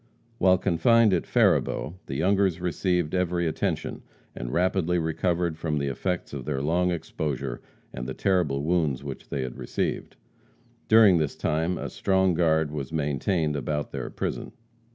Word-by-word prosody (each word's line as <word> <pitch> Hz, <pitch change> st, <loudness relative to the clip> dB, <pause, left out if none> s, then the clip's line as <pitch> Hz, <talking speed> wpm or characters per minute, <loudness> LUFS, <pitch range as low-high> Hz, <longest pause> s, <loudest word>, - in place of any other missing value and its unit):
While 95 Hz, -1 st, +5 dB
confined 110 Hz, +4 st, +4 dB
at 85 Hz, -, 0 dB
Faribault, 75 Hz, -, +2 dB
the 65 Hz, -, -4 dB
Youngers 95 Hz, +2 st, +2 dB
received 90 Hz, -2 st, 0 dB
every 90 Hz, -1 st, 0 dB
attention, 80 Hz, -, -2 dB, 0.3 s
and -, -, -5 dB
rapidly 90 Hz, +1 st, +1 dB
recovered 85 Hz, 0 st, -1 dB
from 80 Hz, -2 st, -1 dB
the 70 Hz, -1 st, -1 dB
effects 90 Hz, +6 st, -3 dB
of 70 Hz, -3 st, -5 dB
their 70 Hz, 0 st, -2 dB
long 85 Hz, +6 st, +1 dB
exposure 75 Hz, -6 st, -3 dB, 0.3 s
and 60 Hz, -, -5 dB
the 65 Hz, -, -5 dB
terrible 85 Hz, -8 st, +1 dB
wounds 75 Hz, -5 st, 0 dB
which 70 Hz, -3 st, -8 dB
they 70 Hz, -, -2 dB
had 65 Hz, -1 st, -6 dB
received. -, -, -3 dB, 0.7 s
During 110 Hz, -6 st, +7 dB
this 75 Hz, -2 st, -1 dB
time 80 Hz, +4 st, 0 dB
a -, -, -4 dB
strong 95 Hz, -1 st, +1 dB
guard 80 Hz, -2 st, +2 dB
was 75 Hz, 0 st, -5 dB
maintained 75 Hz, +1 st, 0 dB
about 75 Hz, +2 st, -2 dB
their -, -, -4 dB
prison. -, -, -4 dB
80 Hz, 155 wpm, -26 LUFS, 75-90 Hz, 0.7 s, During